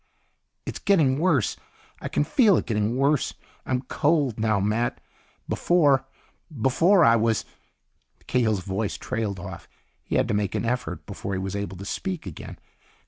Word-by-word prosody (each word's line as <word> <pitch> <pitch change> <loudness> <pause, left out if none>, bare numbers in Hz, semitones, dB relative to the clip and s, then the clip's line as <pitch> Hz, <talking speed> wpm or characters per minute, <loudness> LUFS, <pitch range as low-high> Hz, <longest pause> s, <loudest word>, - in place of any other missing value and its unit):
"It's - - -5
getting 150 -9 +3
worse. 160 - +2 0.4
I - - -4
can - - +1
feel 200 - +4
it - - -1
getting 110 +1 0
worse. 140 +1 +1 0.3
I'm 130 0 0
cold 145 -4 +1
now, 110 -2 +2
Matt. 110 +4 0 0.5
Before... 145 -7 +3 0.5
before 165 - +4
I 115 - +6
was...." 115 -1 +1 0.8
Cahill's 110 -6 +1
voice 100 +3 -3
trailed 105 -4 -3
off. 90 -1 -8 0.4
He - - -3
had 130 - +2
to - - +1
make 105 -2 -1
an - - -1
effort 125 +2 -3
before 100 - -5
he 95 - -1
was 95 +1 -4
able 100 -2 -4
to 100 - -8
speak 185 - -4
again. 90 -6 -8
115 Hz, 155 wpm, -25 LUFS, 105-145 Hz, 0.8 s, I